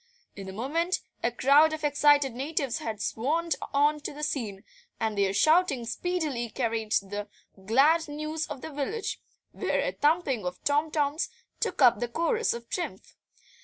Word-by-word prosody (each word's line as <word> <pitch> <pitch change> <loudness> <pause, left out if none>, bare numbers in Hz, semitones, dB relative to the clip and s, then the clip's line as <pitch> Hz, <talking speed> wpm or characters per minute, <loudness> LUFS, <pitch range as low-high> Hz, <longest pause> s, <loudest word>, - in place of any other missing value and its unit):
In 195 -1 -7
a - - -5
moment 325 - -1 0.2
a 235 - +2
crowd 285 +6 +5
of 310 0 -5
excited 290 -2 +4
natives 275 0 -2
had 220 -2 -4
swarmed 310 +11 0 0.2
on 295 +2 +3
to 295 - -6
the 300 +1 -8
scene, 215 -9 -3 0.4
and 220 -2 -1
their 200 -1 +2
shouting 310 - +3
speedily 295 -4 -2
carried 225 -3 -2
the 205 +1 -1 0.4
glad 300 +8 +4
news 305 +2 -4
to 300 - -5
the 275 +4 -8
village, 300 +10 -3 0.3
where - - -1
a - - -1
thumping 290 - +1
of 180 0 -4
tom 295 +2 +2
toms 300 +1 0 0.3
took - - 0
up 240 -4 +6
the 240 - -1
chorus 335 - 0
of 235 0 -5
triumph. 355 +6 -5
285 Hz, 165 wpm, -28 LUFS, 230-315 Hz, 0.4 s, up